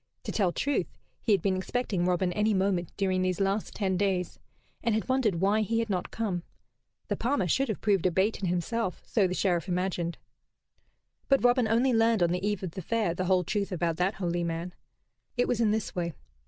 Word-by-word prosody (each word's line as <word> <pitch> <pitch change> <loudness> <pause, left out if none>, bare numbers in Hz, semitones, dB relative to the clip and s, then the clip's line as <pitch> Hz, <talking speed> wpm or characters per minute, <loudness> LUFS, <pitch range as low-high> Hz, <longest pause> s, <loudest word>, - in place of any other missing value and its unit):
To - - -4
tell 190 -5 +1
truth, 285 +10 0 0.3
he 225 - 0
had 195 -5 +3
been 195 -2 +2
expecting 190 -1 -1
Robin 180 0 +1
any 210 +1 +2
moment 185 -3 0
during 185 -2 +1
these 185 0 0
last 195 +2 -1
ten 190 -3 0
days, 185 -3 -1 0.4
and 230 -2 +2
had 220 - -1
wondered 260 -7 +2
why 200 +5 +2
he 225 +2 0
had 230 -2 0
not 180 -2 -1
come. 200 -6 -2 0.7
The - - 0
palmer 240 -7 0
should 265 - +1
have 215 - -3
proved 195 -4 +2
a - - +1
bait 190 +5 +1
in 195 - -2
himself, 180 +3 -1
so 205 -5 +2
the 180 - -3
Sheriff 175 -3 +1
imagined. 180 -2 -1 1.1
But 275 -2 +4
Robin 245 -1 +4
only 240 +4 +3
learned 225 -3 +3
on 170 - +2
the 180 +1 -1
eve 205 -2 -1
of 180 - -3
the 190 - -6
Fair 215 -1 0
the 185 +2 -2
whole 185 0 +3
truth 200 +3 -2
about 170 -2 -1
that 185 +3 +1
holy 175 -2 -1
man. 170 +1 -3 0.6
It 245 - +2
was 235 -1 0
in 220 - +4
this 215 0 -1
way. 170 -2 -2
195 Hz, 210 wpm, -28 LUFS, 180-220 Hz, 1.1 s, But